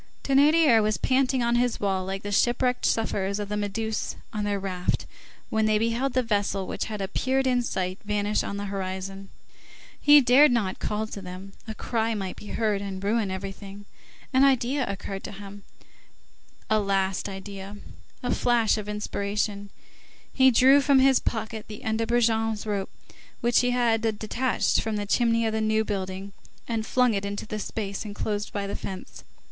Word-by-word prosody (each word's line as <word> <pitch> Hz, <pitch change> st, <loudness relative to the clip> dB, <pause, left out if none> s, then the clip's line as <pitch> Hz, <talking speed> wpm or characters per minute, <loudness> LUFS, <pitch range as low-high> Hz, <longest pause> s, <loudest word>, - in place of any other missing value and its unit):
Thénardier 280 Hz, -3 st, +5 dB
was 215 Hz, -1 st, +1 dB
panting 260 Hz, -1 st, +1 dB
on 235 Hz, 0 st, +2 dB
his 245 Hz, -1 st, +1 dB
wall 190 Hz, -2 st, 0 dB
like 195 Hz, +1 st, -4 dB
the 205 Hz, -, -4 dB
shipwrecked 245 Hz, +4 st, +2 dB
sufferers 200 Hz, -3 st, 0 dB
of 205 Hz, -1 st, -4 dB
the 210 Hz, -, -2 dB
Méduse 210 Hz, +2 st, -2 dB, 0.2 s
on 210 Hz, -1 st, -2 dB
their 205 Hz, -1 st, -1 dB
raft 185 Hz, -2 st, -2 dB, 0.5 s
when 220 Hz, 0 st, +2 dB
they 215 Hz, 0 st, +3 dB
beheld 230 Hz, +4 st, 0 dB
the 255 Hz, -, +2 dB
vessel 205 Hz, -3 st, 0 dB
which -, -, -3 dB
had 210 Hz, -2 st, -4 dB
appeared 265 Hz, +7 st, 0 dB
in 250 Hz, -1 st, +2 dB
sight 185 Hz, -5 st, -3 dB
vanish 210 Hz, 0 st, 0 dB
on 200 Hz, -, -4 dB
the 200 Hz, -, -4 dB
horizon. 195 Hz, 0 st, -5 dB, 0.7 s
He 295 Hz, 0 st, +8 dB
dared 265 Hz, +2 st, +6 dB
not 210 Hz, -6 st, 0 dB
call 210 Hz, +1 st, -2 dB
to 210 Hz, -2 st, -8 dB
them; 185 Hz, +1 st, -9 dB
a 220 Hz, -, -5 dB
cry 225 Hz, 0 st, -1 dB
might 190 Hz, -3 st, -4 dB
be 210 Hz, -, -11 dB
heard 210 Hz, -3 st, 0 dB
and 195 Hz, -1 st, -6 dB
ruin 210 Hz, 0 st, +1 dB
everything. 195 Hz, +1 st, -7 dB, 0.5 s
An 260 Hz, +1 st, +5 dB
idea 265 Hz, 0 st, +2 dB
occurred 195 Hz, 0 st, -6 dB
to -, -, -6 dB
him, 200 Hz, 0 st, -10 dB, 1.1 s
a 215 Hz, -, +3 dB
last 195 Hz, -1 st, 0 dB
idea, 195 Hz, +1 st, -8 dB, 0.5 s
a 245 Hz, -, 0 dB
flash 230 Hz, -3 st, +2 dB
of 210 Hz, 0 st, -6 dB
inspiration; 205 Hz, 0 st, -2 dB, 0.6 s
he 260 Hz, -1 st, +6 dB
drew 265 Hz, +3 st, +6 dB
from 280 Hz, -1 st, +4 dB
his 265 Hz, -1 st, +5 dB
pocket 220 Hz, -1 st, -4 dB
the 215 Hz, +4 st, -9 dB
end 220 Hz, -1 st, -1 dB
of 225 Hz, -, -1 dB
Brujon's 225 Hz, -2 st, +1 dB
rope, 200 Hz, -2 st, -2 dB, 0.5 s
which 240 Hz, -1 st, +3 dB
he 250 Hz, -, +2 dB
had 240 Hz, -2 st, +2 dB, 0.2 s
detached 240 Hz, +4 st, 0 dB
from 220 Hz, -1 st, -2 dB
the 205 Hz, 0 st, -2 dB
chimney 230 Hz, +2 st, +2 dB
of 220 Hz, -, 0 dB
the 220 Hz, -, 0 dB
New 220 Hz, 0 st, +1 dB
Building, 195 Hz, -1 st, -4 dB, 0.3 s
and 225 Hz, -2 st, -2 dB
flung 250 Hz, -2 st, +3 dB
it 200 Hz, -1 st, -1 dB
into 200 Hz, +1 st, -4 dB
the 215 Hz, 0 st, -5 dB
space 200 Hz, -2 st, -4 dB
enclosed 205 Hz, 0 st, -3 dB
by 200 Hz, -1 st, -3 dB
the 200 Hz, -, -4 dB
fence. 190 Hz, -1 st, -7 dB
215 Hz, 175 wpm, -26 LUFS, 200-235 Hz, 1.1 s, He